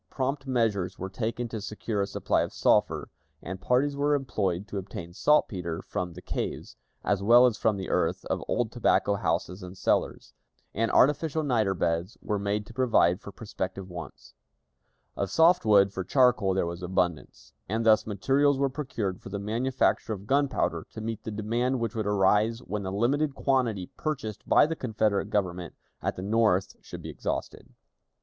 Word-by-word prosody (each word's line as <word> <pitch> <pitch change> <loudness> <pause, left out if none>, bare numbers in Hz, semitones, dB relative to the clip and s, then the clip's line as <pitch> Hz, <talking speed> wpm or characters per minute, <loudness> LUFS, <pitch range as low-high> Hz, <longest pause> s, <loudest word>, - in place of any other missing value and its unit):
Prompt 135 +1 -2
measures 105 -7 0
were 95 0 -5
taken 115 +3 -3
to 110 -2 -5
secure 105 0 -3
a 100 - 0
supply - - 0
of - - -2
sulphur, - - +2 0.4
and 90 +2 -6
parties 140 +3 +1
were 145 +1 +2
employed 100 -8 -2
to 100 - -4
obtain 85 -3 -8
saltpeter 90 - +1
from 90 -1 -4
the 90 - -11
caves, - - -4 0.3
as 100 -1 +1
well 120 +5 +7
as 120 -3 +2
from 105 0 +1
the 95 - -5
earth - - 0
of - - -2
old 120 -2 0
tobacco 115 -3 +2
houses 90 0 -2
and 90 +1 -9
cellars; - - -1 0.4
and 115 +2 0
artificial 155 +3 +3
niter 110 -8 +1
beds 85 +3 -1
were 105 -2 -2
made 100 +1 -1
to 115 - -13
provide 110 -8 +3
for 100 - -9
prospective 95 -3 -6
wants. 85 -4 -9 0.8
Of 100 - -2
soft 165 -3 +4
wood 100 -2 +5
for 95 - -3
charcoal 120 -3 +3
there 95 - +1
was 85 +1 -5
abundance, 90 -8 -2 0.2
and 110 +3 -1
thus 110 -1 +5
materials 135 +7 +2
were 140 0 +1
procured 115 -9 -4
for - - -9
the 100 - -4
manufacture 115 +3 0
of 100 -1 -8
gunpowder 140 +4 0
to - - -7
meet 110 0 -5
the - - -3
demand 120 +5 -1
which 115 -1 -2
would 110 -3 -2
arise 105 +3 +3
when 105 -1 -4
the 95 -1 -4
limited 135 +8 +1
quantity 120 -10 0
purchased 125 -9 -4
by - - +6
the 165 +2 -2
Confederate 110 -6 0
Government 90 -4 -2 0.3
at - - -2
the 90 - -6
North 105 -3 +2
should - - -9
be - - -6
exhausted. - - -4
105 Hz, 175 wpm, -27 LUFS, 95-125 Hz, 0.8 s, well